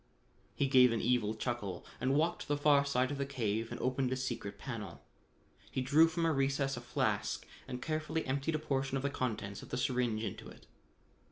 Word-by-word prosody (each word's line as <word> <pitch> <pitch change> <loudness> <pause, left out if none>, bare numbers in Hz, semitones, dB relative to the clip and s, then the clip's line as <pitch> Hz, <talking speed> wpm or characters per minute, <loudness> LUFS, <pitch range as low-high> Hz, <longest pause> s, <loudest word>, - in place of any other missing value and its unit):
He 140 - +2
gave 130 -2 +6
an 115 - 0
evil 115 -3 +1
chuckle 110 -6 -3
and 135 +1 +1
walked 165 +4 +1
to - - -7
the 145 0 +1
far 145 -1 +5
side 130 -1 +1
of 140 - -4
the 140 - 0
cave 115 -4 -1
and - - -5
opened 130 0 0
a - - +1
secret 125 -6 -4
panel. 115 -6 -6 0.7
He 130 - -2
drew 150 +5 +6
from 165 +1 -1
a 165 - +3
recess 135 0 +1
a 120 - -6
flask 120 - -1 0.2
and 125 -1 -5
carefully 155 0 -1
emptied 140 +4 0
a - - +2
portion 135 -3 -1
of 135 - -4
the 140 - 0
contents 105 -7 -3
of - - -11
the - - -2
syringe 125 -3 0
into 100 - -5
it. - - -15
130 Hz, 205 wpm, -34 LUFS, 120-140 Hz, 0.7 s, gave